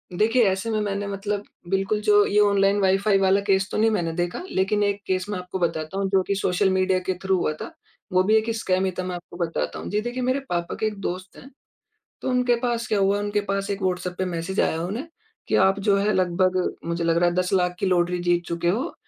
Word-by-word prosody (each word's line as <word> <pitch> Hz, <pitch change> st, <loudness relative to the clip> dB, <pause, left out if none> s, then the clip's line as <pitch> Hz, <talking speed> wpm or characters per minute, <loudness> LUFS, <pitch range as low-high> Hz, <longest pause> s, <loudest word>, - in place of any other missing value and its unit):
देखिए 225 Hz, +6 st, +3 dB
ऐसे 190 Hz, +4 st, -2 dB
में 215 Hz, -, 0 dB
मैंने 205 Hz, -1 st, -2 dB
मतलब, 200 Hz, +1 st, -3 dB, 0.3 s
बिल्कुल 195 Hz, +2 st, 0 dB
जो 205 Hz, -1 st, +5 dB
ये 205 Hz, -, +2 dB
ऑनलाइन 200 Hz, -1 st, +3 dB
वाई 190 Hz, 0 st, +4 dB
फ़ाई 200 Hz, 0 st, +2 dB
वाला 195 Hz, +1 st, +3 dB
केस 190 Hz, -1 st, +2 dB
तो -, -, -2 dB
नहीं 220 Hz, +1 st, +4 dB
मैंने 175 Hz, -6 st, 0 dB
देखा 175 Hz, 0 st, -2 dB
लेकिन 200 Hz, +2 st, +1 dB
1 200 Hz, 0 st, 0 dB
केस 185 Hz, -1 st, 0 dB
मैं 205 Hz, -, -2 dB
आपको 180 Hz, +1 st, -6 dB
बताता 165 Hz, +1 st, -2 dB
हूँ 195 Hz, -1 st, 0 dB
जो 190 Hz, -1 st, +3 dB
की 200 Hz, -, +1 dB
सोशल 190 Hz, 0 st, +1 dB
मीडिया 185 Hz, 0 st, +2 dB
के 185 Hz, +1 st, -2 dB
थ्रू 190 Hz, 0 st, +2 dB
हुआ 155 Hz, -, 0 dB
था। -, -, -6 dB, 0.4 s
वो 185 Hz, 0 st, +4 dB
भी 215 Hz, +3 st, +3 dB
एक 220 Hz, +1 st, +2 dB
स्कैम 190 Hz, -3 st, 0 dB
ही 190 Hz, -, 0 dB
था -, -, -1 dB
मैं 180 Hz, 0 st, -4 dB
आपको 175 Hz, 0 st, -10 dB
बताता 170 Hz, -2 st, -2 dB
हूँ। -, -, -6 dB
जी 210 Hz, +1 st, 0 dB
देखिए 240 Hz, +3 st, -4 dB
मेरे 255 Hz, +2 st, +1 dB
पापा 170 Hz, -1 st, -2 dB
के -, -, 0 dB
एक 210 Hz, -1 st, -5 dB
दोस्त 185 Hz, 0 st, -5 dB
हैं, 270 Hz, -, -13 dB, 0.7 s
तो -, -, -2 dB
उनके 250 Hz, -1 st, +2 dB
पास 240 Hz, -1 st, -1 dB
क्या 210 Hz, -, +1 dB
हुआ 200 Hz, +1 st, +2 dB
उनके 205 Hz, 0 st, -1 dB
पास 195 Hz, 0 st, -1 dB
1 200 Hz, 0 st, -3 dB
व्हाट्सएप 180 Hz, -1 st, -1 dB
पे 185 Hz, -, 0 dB
मैसेज 180 Hz, +1 st, -2 dB
आया 160 Hz, -, 0 dB
उन्हें, 220 Hz, -, -4 dB, 0.4 s
कि -, -, 0 dB
आप 195 Hz, +1 st, +4 dB
जो 200 Hz, -, +5 dB
है 205 Hz, +2 st, +1 dB
लगभग, 185 Hz, 0 st, +1 dB
मुझे 170 Hz, 0 st, -2 dB
लग 165 Hz, 0 st, +2 dB
रहा 175 Hz, +1 st, +4 dB
है 175 Hz, -, -2 dB
10 180 Hz, +1 st, 0 dB
लाख 180 Hz, -2 st, +2 dB
की 195 Hz, -, -1 dB
लॉटरी 180 Hz, -1 st, +1 dB
जीत 175 Hz, 0 st, +2 dB
चुके 170 Hz, 0 st, -1 dB
हो, 220 Hz, +10 st, -1 dB
190 Hz, 250 wpm, -24 LUFS, 180-205 Hz, 0.7 s, जो